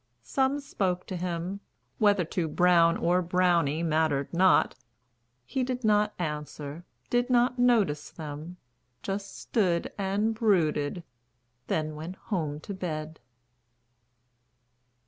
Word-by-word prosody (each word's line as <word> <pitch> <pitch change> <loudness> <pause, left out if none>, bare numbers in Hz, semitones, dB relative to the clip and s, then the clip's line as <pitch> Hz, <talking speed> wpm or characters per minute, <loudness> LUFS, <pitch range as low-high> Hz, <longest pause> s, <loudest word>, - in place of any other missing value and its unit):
Some 270 +1 +1
spoke 185 -10 -2
to 185 - -5
him; 180 +2 -3 0.4
Whether 205 -4 +4
to 170 0 -2
Brown 170 0 +4
or 180 +2 +2
Brownie 170 -3 +2
mattered 155 -3 +1
not, 185 +2 +4 0.7
He 255 - -1
did 250 0 -3
not 210 -1 +3
answer, 150 0 -5 0.3
did 245 +1 +2
not 245 0 +3
notice 215 -12 +2
them, 155 +3 -8 0.5
Just 195 0 -4
stood 180 -7 0
and 200 +3 +1
brooded.... 175 -7 +1 0.6
Then 155 -1 -1
went 160 +5 -7
home 155 -8 -3
to 200 - -6
bed. 160 -4 -5
180 Hz, 110 wpm, -28 LUFS, 160-205 Hz, 0.7 s, Whether